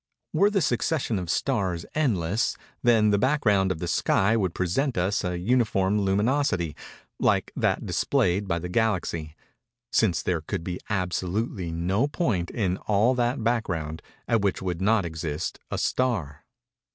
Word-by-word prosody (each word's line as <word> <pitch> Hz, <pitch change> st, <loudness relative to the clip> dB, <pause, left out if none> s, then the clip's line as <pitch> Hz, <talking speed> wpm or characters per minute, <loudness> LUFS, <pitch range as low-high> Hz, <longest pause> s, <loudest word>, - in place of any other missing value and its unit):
Were 200 Hz, -, +4 dB
the 205 Hz, -2 st, +1 dB
succession 125 Hz, -, 0 dB
of 90 Hz, -2 st, -6 dB
stars 95 Hz, -7 st, 0 dB
endless, 110 Hz, -, 0 dB, 0.2 s
then 110 Hz, -3 st, +4 dB
the 100 Hz, -, +3 dB
background 105 Hz, -8 st, +2 dB
of 95 Hz, -, -2 dB
the 85 Hz, -, -4 dB
sky 95 Hz, +5 st, +2 dB
would 95 Hz, -6 st, 0 dB
present 120 Hz, -, 0 dB
us 95 Hz, +4 st, +1 dB
an 90 Hz, -1 st, -3 dB
uniform 105 Hz, -4 st, +2 dB
luminosity, 100 Hz, -, +1 dB, 0.4 s
like -, -, +2 dB
that -, -, 0 dB
displayed 95 Hz, +3 st, +1 dB
by 85 Hz, -, 0 dB
the 85 Hz, +1 st, -4 dB
Galaxy—_since 105 Hz, +1 st, -2 dB
there 85 Hz, -3 st, 0 dB
could 80 Hz, -, -4 dB
be 90 Hz, 0 st, -4 dB
absolutely 95 Hz, 0 st, -2 dB
no 95 Hz, +10 st, 0 dB
point, 110 Hz, -, -1 dB
in 95 Hz, -5 st, -1 dB
all 110 Hz, +6 st, +2 dB
that 120 Hz, 0 st, 0 dB
background, 85 Hz, -10 st, -1 dB, 0.3 s
at 115 Hz, -3 st, +2 dB
which 100 Hz, -1 st, 0 dB
would 90 Hz, -2 st, -3 dB
not 105 Hz, -1 st, +3 dB
exist 80 Hz, -2 st, -4 dB
a -, -, -3 dB
star. 85 Hz, -, -1 dB
100 Hz, 145 wpm, -26 LUFS, 90-120 Hz, 0.4 s, Were